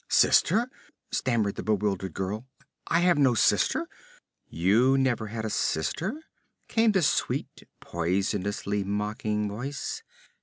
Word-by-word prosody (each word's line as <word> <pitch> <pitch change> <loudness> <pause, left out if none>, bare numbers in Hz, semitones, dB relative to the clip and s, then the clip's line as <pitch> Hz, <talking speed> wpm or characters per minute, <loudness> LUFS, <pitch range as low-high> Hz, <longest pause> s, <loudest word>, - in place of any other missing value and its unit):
'Sister?' 235 +3 +4 0.4
stammered 110 -5 0
the - - -6
bewildered 100 -4 -1
girl. 105 +6 -4 0.4
'I 165 - +2
have 175 -2 +4
no 130 -4 +4
sister.' - - +2 0.6
'You 110 - +3
never 125 -5 +1
had 110 +1 -5
a - - -2
sister?' 190 - -1 0.4
came 225 -1 +3
the 190 -3 +2
sweet, - - -1
poisonously 100 +3 -1
mocking 105 +2 -2
voice. 125 +8 -5
110 Hz, 115 wpm, -27 LUFS, 100-135 Hz, 0.6 s, Sister